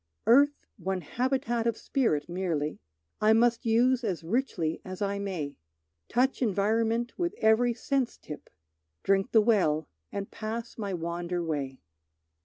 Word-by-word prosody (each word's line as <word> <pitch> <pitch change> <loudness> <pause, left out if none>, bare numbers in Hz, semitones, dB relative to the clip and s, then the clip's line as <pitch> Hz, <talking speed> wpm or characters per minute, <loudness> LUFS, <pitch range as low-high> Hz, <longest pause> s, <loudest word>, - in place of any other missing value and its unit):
Earth 285 +5 +4
one 190 -1 -2
habitat 240 - -1
of 230 - 0
spirit 190 - 0
merely, 170 -4 -2 0.4
I 215 +1 +6
must 235 +1 +3
use 245 +3 +3
as 185 -7 -2
richly 175 -5 -1
as 185 0 -7
I 200 -1 -1
may, 175 -8 -4 0.5
Touch 260 +4 +1
environment 225 - +1
with 345 -1 -1
every 230 +2 +3
sense 265 +1 -1
tip, 150 - -10 0.5
Drink 195 +5 +2
the 220 - +6
well 175 -9 +2 0.2
and 200 0 -5
pass 230 +1 -5
my 205 -3 -4
wander 175 0 -3
way. 140 -5 -3
215 Hz, 135 wpm, -29 LUFS, 175-235 Hz, 0.5 s, I